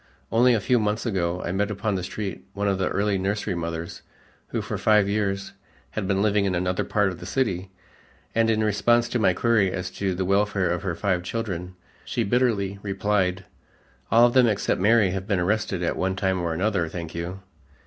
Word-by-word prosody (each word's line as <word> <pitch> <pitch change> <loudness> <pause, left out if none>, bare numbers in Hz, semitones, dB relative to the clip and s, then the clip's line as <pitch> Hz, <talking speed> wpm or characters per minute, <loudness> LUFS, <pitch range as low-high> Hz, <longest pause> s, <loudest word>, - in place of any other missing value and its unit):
Only 120 +2 +5
a - - +1
few 125 +4 +2
months 105 +2 -1
ago 90 -5 -1
I - - -2
met 100 +2 0
upon 105 +1 -2
the 95 - -1
street 95 0 -5
one 100 +1 -1
of 95 -1 +1
the 95 - +1
early 100 -1 0
nursery 100 +1 -1
mothers 85 -1 -5 0.5
who - - -3
for - - -4
five 105 -2 +4
years 100 -1 -1 0.4
had 105 -3 -3
been 100 0 +1
living 105 -1 +2
in 95 -2 0
another 90 +1 0
part 105 -2 +1
of 90 - -7
the 90 - -8
city, 95 -7 -1 0.6
and 115 0 +2
in 110 -1 +2
response 115 +3 +3
to 125 - -1
my 95 -4 +3
query 110 -3 +2
as 90 0 -4
to 95 -2 -2
the 95 +1 -1
welfare 100 -1 +1
of 90 - -1
her 90 -4 -2
five 90 -1 0
children, 90 -3 -4 0.3
she 120 - -1
bitterly 100 -4 +1
replied, 95 -2 0 0.7
"All 115 +2 +7
of 120 - +2
them 130 -2 +6
except 105 -4 0
Mary 105 -1 +4
have 95 +1 -4
been 95 -3 +1
arrested 95 -1 0
at 85 - 0
one 95 0 -1
time 95 -1 0
or 85 -1 -1
another, 90 0 0
thank 85 -1 -6
you." 85 +3 -5
100 Hz, 205 wpm, -25 LUFS, 90-105 Hz, 0.7 s, All